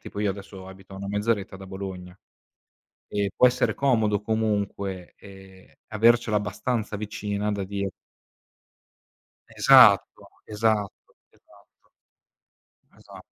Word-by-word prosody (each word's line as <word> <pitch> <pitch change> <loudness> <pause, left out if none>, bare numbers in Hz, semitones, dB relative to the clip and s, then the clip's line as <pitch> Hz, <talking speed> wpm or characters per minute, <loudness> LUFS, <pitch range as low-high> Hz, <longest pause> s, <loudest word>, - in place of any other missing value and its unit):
tipo 105 - -8
io 105 -1 +1
adesso, 95 -1 -10
abito 95 0 -14
a - - -9
una 100 0 -7
mezz'oretta 105 0 -2
da 95 0 -11
Bologna. 95 -2 -8 0.9
E 100 -1 -2
può - - +5
essere 125 - +2
comodo 110 -7 +1
comunque, 100 -4 -3
ehm, 95 -1 -16 0.2
avercela 110 0 +3
abbastanza 105 +2 -3
vicina 105 0 -3
da 100 -2 -3
dire 100 0 -4 1.7
Esatto, - - +6 0.2
esatto, 105 -2 0 0.4
esatto. - - -26 1.1
Esa - - -14
100 Hz, 110 wpm, -25 LUFS, 95-110 Hz, 1.7 s, Esatto